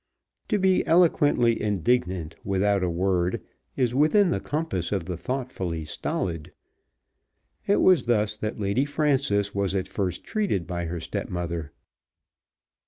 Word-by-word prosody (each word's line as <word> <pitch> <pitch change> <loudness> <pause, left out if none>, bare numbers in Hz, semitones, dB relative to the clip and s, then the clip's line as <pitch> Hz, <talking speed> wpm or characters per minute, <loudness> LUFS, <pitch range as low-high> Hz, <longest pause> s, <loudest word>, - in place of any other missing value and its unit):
To 210 - +1
be 190 -1 +3
eloquently 145 -8 +3
indignant 95 -5 0
without 100 +1 +1
a 90 - +1
word 90 +1 0 0.4
is 125 -3 +1
within 170 +8 +4
the - - 0
compass 145 - -3
of 95 -5 -1
the 90 - -4
thoughtfully 95 - -4
stolid. 80 +1 -3 1.2
It 200 - +3
was 180 -9 +5
thus 105 -3 +2
that 110 +1 -4
Lady 100 +6 +1
Frances 140 -9 +1
was 100 -1 -1
at 95 -1 -1
first 95 -2 -3
treated 200 - -1
by 85 +1 -3
her 85 +1 -4
stepmother. 85 -1 -4
100 Hz, 130 wpm, -25 LUFS, 90-135 Hz, 1.2 s, was